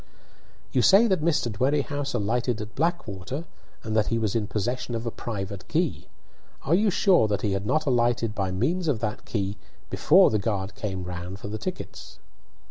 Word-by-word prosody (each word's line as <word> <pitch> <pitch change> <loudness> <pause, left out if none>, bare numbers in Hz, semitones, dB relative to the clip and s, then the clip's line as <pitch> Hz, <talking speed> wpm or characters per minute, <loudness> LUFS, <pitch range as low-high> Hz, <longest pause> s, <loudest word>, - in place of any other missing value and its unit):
"You 130 - +2
say 195 - +7
that 190 -7 +2
Mr. 150 -7 +1
Dwerrihouse 140 +4 0
alighted 115 +3 0
in 105 0 -5
Blackwater, 145 - -2 0.4
and 110 -1 -3
that 110 -1 +3
he 115 - +1
was 110 -3 0
in 110 -3 0
possession 120 +4 -2
of 115 +1 -4
a 115 - -2
private 100 -4 -5
key. 165 -1 -1 0.6
Are 145 - +1
you 205 +4 +4
sure 180 - +4
that 100 -2 -1
he 105 - +1
had 100 +1 -2
not 155 +5 +1
alighted 120 -4 +1
by 95 -3 -1
means 155 - 0
of 140 -7 +1
that 105 -2 -3
key 100 -2 -2 0.3
before - - +5
the 110 - +2
guard 100 -2 -2
came 95 -4 -4
round 90 +1 -6
for 100 - -7
the 110 +1 -4
tickets?" 185 - -7
115 Hz, 185 wpm, -26 LUFS, 100-145 Hz, 0.6 s, say